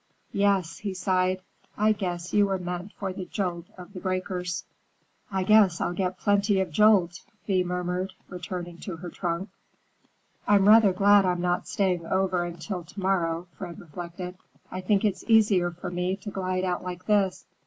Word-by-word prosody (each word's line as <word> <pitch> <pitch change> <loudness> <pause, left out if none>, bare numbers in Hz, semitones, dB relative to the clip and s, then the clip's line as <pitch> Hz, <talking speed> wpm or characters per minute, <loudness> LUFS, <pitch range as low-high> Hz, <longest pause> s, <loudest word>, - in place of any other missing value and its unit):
Yes," 195 -4 +1
he 200 -3 -4
sighed, 185 0 +1 0.3
"I 215 +1 +4
guess 180 -4 -3
you 205 -1 +4
were 195 -1 0
meant 180 +2 -5
for 190 -2 -4
the 185 0 -6
jolt 175 -2 -3
of 180 +2 -11
the 185 - -6
breakers." 185 -1 -3 0.7
"I 190 -1 0
guess 200 -4 +5
I'll 175 - -1
get 185 0 -2
plenty 205 0 +2
of 190 -3 -1
jolt," 185 -2 +4 0.3
Thea 185 -3 +2
murmured, 180 +1 -2 0.3
turning 175 -2 -6
to 185 - -6
her 175 +2 -7
trunk. 175 +2 -3 1.0
"I'm 200 -1 +5
rather 215 -2 +7
glad 200 +2 +5
I'm 180 -1 0
not 180 0 0
staying 180 -4 0
over 190 -1 +1
until 175 +2 -5
to 175 +5 -11
morrow," 175 -3 0
Fred 170 - -7
reflected. 175 +2 -8 0.3
"I 185 - -4
think 200 +3 +2
it's 205 - 0
easier 210 -6 +4
for 175 +1 -7
me 180 +1 -1
to 205 +1 -8
glide 185 -1 -2
out 180 -1 -1
like 180 0 -6
this. 200 -3 +1
185 Hz, 170 wpm, -27 LUFS, 175-195 Hz, 1.0 s, rather